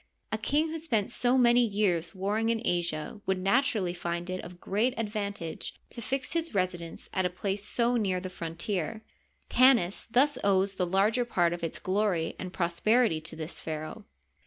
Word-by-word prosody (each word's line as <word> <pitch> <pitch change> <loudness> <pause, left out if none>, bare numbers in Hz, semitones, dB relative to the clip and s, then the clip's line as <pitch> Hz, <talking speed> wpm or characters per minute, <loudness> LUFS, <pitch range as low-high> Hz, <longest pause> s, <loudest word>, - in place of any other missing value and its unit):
A 215 - +1
king 295 +8 +1
who 325 +1 -4
spent 230 -11 0
so 250 +1 +2
many 245 -1 +5
years 200 -5 0
warring 210 +4 0
in 230 -1 +1
Asia 170 +2 -1
would 190 0 +2
naturally 195 -2 +1
find 175 0 -3
it 185 - -3
of 175 +1 -10
great 225 +8 0
ad 225 -2 -1
vantage 200 -6 -4 0.2
to 235 - -8
fix 265 +6 -3
his 330 -7 -1
residence 180 -3 -2
at 190 - +1
a 180 - +1
place 195 +2 -3
so 240 +2 +3
near 190 -5 0
the 185 - -5
frontier. 175 +5 -3 0.4
Tanis 240 -8 +4
thus 275 +5 +3
owes 195 0 +3
the 185 -2 -1
larger 205 +7 +2
part 175 -8 +1
of 175 - -6
its 165 - -3
glory 190 -4 0
and 185 - -5
prosper 185 +8 +2
ity 160 -9 0
to 155 - -8
this 160 0 -7
pharaoh. 155 +7 -6
195 Hz, 185 wpm, -29 LUFS, 175-230 Hz, 0.4 s, many